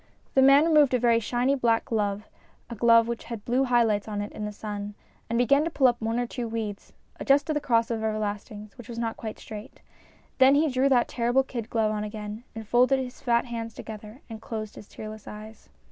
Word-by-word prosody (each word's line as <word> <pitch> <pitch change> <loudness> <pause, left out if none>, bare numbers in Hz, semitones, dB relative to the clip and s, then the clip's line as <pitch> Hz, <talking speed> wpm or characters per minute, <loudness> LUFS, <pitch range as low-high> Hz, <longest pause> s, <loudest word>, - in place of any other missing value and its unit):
The 265 - +4
man 275 +3 +7
removed 300 -5 +4
a - - +1
very 235 -1 +3
shiny 245 +4 0
black 235 -4 +1
glove, 210 -2 -2 0.4
a - - -4
glove 230 +1 +5
which 235 -1 -4
had 230 -3 -7
blue 255 +3 +2
high 240 -2 +4
lights 210 -2 0
on 210 -1 -4
it 205 0 -4
in 210 - -5
the 210 - -4
sun, 205 -1 -6 0.3
and 230 - 0
began 280 +4 +4
to 330 - -1
pull 285 -4 +1
up 240 -2 +3
one 225 +1 -1
or 245 - 0
two 240 0 -5
weeds, 220 -3 -5 0.3
adjusted 285 +3 +2
the 295 - -1
cross 230 -4 +1
of 225 -1 -2
everlastings, 210 -1 -4
which 240 - -11
was 235 - -7
not 230 -1 -2
quite 220 -1 -7
straight. 215 +4 -10 0.6
Then 265 +1 +7
he 305 +2 +3
drew 260 +2 +2
that 250 -3 +3
terrible 245 +2 +1
kid 235 -4 -6
glove 220 -2 +1
on 210 -1 -2
again 210 +1 -6
and 220 -1 -7
folded 250 +4 +4
his 255 -1 -6
fat 235 -1 +2
hands 230 -2 -6
together 215 +3 -9
and 225 -2 -9
closed 215 -2 -6
his 205 - -12
tearless 215 -1 -9
eyes. 215 +1 -11
230 Hz, 225 wpm, -26 LUFS, 215-250 Hz, 0.6 s, man